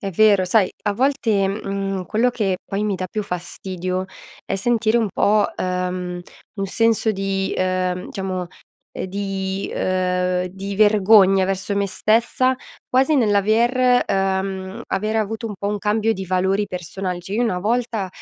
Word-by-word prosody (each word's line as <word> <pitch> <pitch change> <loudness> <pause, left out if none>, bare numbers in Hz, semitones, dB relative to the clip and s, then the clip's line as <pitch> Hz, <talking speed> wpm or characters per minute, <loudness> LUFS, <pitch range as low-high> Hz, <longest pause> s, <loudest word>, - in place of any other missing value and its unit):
È 195 - -3
vero, 205 0 +5
sai 185 +1 +2
a 205 - +1
volte, 225 -5 +1
mhmm, 195 -2 -3
quello 235 +3 +2
che 195 -6 -1
poi 200 +2 -2
mi 205 - 0
dà 185 -1 -4
più 215 -2 -3
fastidio 185 0 -4 0.4
è - - -2
sentire 225 +2 +1
un 225 -3 +2
po', 210 0 +3
ehm, 180 -1 -2 0.3
un 195 -1 -3
senso 225 +2 +2
di, 195 -1 -2
ehm, 185 -1 -1
diciamo, 185 -2 -3 0.5
ehm, - - -4
di 195 0 -3
uhm, 180 0 0
di 195 +2 -6
vergogna 205 -2 +5
verso 190 +1 -2
me 200 0 0
stessa, 235 +6 +2 0.3
quasi 265 +4 +3
nell'aver 235 +3 +3
ehm, 190 +2 -1
aver 215 +3 -1
avuto 220 +1 -2
un 210 - -5
po' 200 - -3
un 205 0 -1
cambio 215 +2 +1
di 190 -2 -5
valori 190 +3 +1
personali, 180 +1 -4
cioè, 180 +3 -9
io 240 - +1
una 185 -6 0
volta 225 -1 -1
195 Hz, 155 wpm, -21 LUFS, 185-215 Hz, 0.5 s, vero